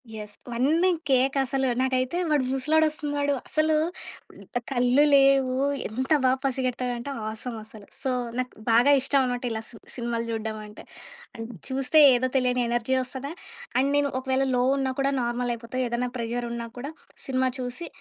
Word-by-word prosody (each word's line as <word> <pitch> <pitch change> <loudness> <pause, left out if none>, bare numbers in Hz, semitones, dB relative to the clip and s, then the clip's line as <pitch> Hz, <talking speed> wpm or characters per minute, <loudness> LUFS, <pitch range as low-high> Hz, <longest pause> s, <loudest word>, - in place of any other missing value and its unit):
Yes. 210 -1 -7
అవన్నీ 285 +10 +2 0.2
కేక 265 0 +3
అసలు. 265 0 0
నాకైతే 260 +4 0
వాడు 295 -3 +3
ముసలోడొస్తున్నాడు. 290 0 +1 0.2
అసలు 310 0 +2 1.0
కళ్ళు 250 +2 +4
లేవు. 275 -2 +5 0.3
ఎంత 260 +6 -4
బా 255 - +5
పసిగెడతాడంటే 255 -1 -2 0.2
ఆసమ్ 225 +2 -6
అసలు. 215 -2 -12
సో, 265 - 0 0.3
నాకు 255 0 -2 0.2
బాగా 240 +5 +6
ఇష్టం 275 +2 +2
అన్నమాట 245 0 -2
ఇలా 220 0 -3
సి 230 - -11 0.2
సినిమాలు 235 -1 -2
చూడడం 220 -1 -3
అంటే. 210 - -12 0.5
అం 225 - -6 0.3
చూస్తే 270 +4 +2 0.2
ఏదో 255 +1 +1
తెలియని 250 -1 +1
ఎనర్జీ 240 +2 0
వస్తది 265 +3 -5 0.5
అండ్ 270 +2 +3
నేను 285 -1 +2
ఒకవేళ 265 0 0
లో 245 - +2 0.2
ఉన్నా 265 -1 0
కూడా 275 0 +2
నార్మల్ 240 +1 -1
అయిపోతా. 230 +2 -8
ఏదైనా 240 +1 -1
ప్రెజర్ 240 +1 -3
ఉన్నా 235 0 -4
కూడా 280 +4 -5 0.3
సినిమా 260 -1 +1
చూసి, 255 +7 -5
255 Hz, 150 wpm, -26 LUFS, 240-275 Hz, 1.0 s, బాగా